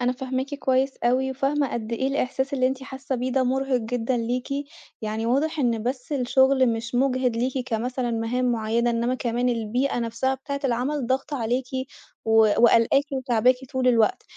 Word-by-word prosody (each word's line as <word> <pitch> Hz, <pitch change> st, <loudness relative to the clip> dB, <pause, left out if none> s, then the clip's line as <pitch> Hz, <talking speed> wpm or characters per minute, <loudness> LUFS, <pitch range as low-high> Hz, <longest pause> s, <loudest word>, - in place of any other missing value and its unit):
أنا 245 Hz, 0 st, +1 dB
فاهماكِ 260 Hz, +2 st, -3 dB
كويس 265 Hz, -1 st, +1 dB
أوي، 260 Hz, +2 st, +2 dB
وفاهمة 275 Hz, +1 st, 0 dB
قد 230 Hz, -1 st, -4 dB
إيه 260 Hz, +3 st, 0 dB
الإحساس 270 Hz, 0 st, -1 dB
اللي 255 Hz, -1 st, +2 dB
أنتِ 265 Hz, 0 st, -2 dB
حاسة 265 Hz, 0 st, -5 dB
بيه 255 Hz, +1 st, -2 dB
ده 265 Hz, 0 st, +2 dB
مُرهِق 265 Hz, +1 st, +1 dB
جدًا 240 Hz, +2 st, -1 dB
ليكِ، 245 Hz, +3 st, -2 dB, 0.5 s
يعني 220 Hz, +1 st, -2 dB
واضح 295 Hz, +6 st, +1 dB
إن 235 Hz, -5 st, +1 dB
بس 250 Hz, +4 st, -4 dB
الشغل 265 Hz, 0 st, +3 dB
مش 230 Hz, +1 st, -5 dB
مُجهِد 255 Hz, -2 st, +1 dB
ليكِ 255 Hz, +3 st, -1 dB
كمثلًا 245 Hz, +2 st, -2 dB
مهام 240 Hz, +2 st, 0 dB
معيّنة، 230 Hz, +1 st, 0 dB
إنّما 235 Hz, +2 st, 0 dB
كمان 245 Hz, 0 st, -1 dB
البيئة 245 Hz, +3 st, -1 dB
نفسها 235 Hz, +3 st, -1 dB
بتاعِة 280 Hz, +1 st, -5 dB
العمل 255 Hz, +2 st, 0 dB
ضاغطة 270 Hz, +3 st, -1 dB
عليكِ 245 Hz, +3 st, -1 dB, 0.6 s
و 225 Hz, -, 0 dB, 0.3 s
وقالقاكِ 235 Hz, +4 st, +5 dB
وتاعباكِ 255 Hz, -2 st, +2 dB, 0.2 s
طول 260 Hz, -1 st, +1 dB
الوقت، 230 Hz, -3 st, +3 dB
255 Hz, 165 wpm, -24 LUFS, 235-265 Hz, 0.6 s, وقالقاكِ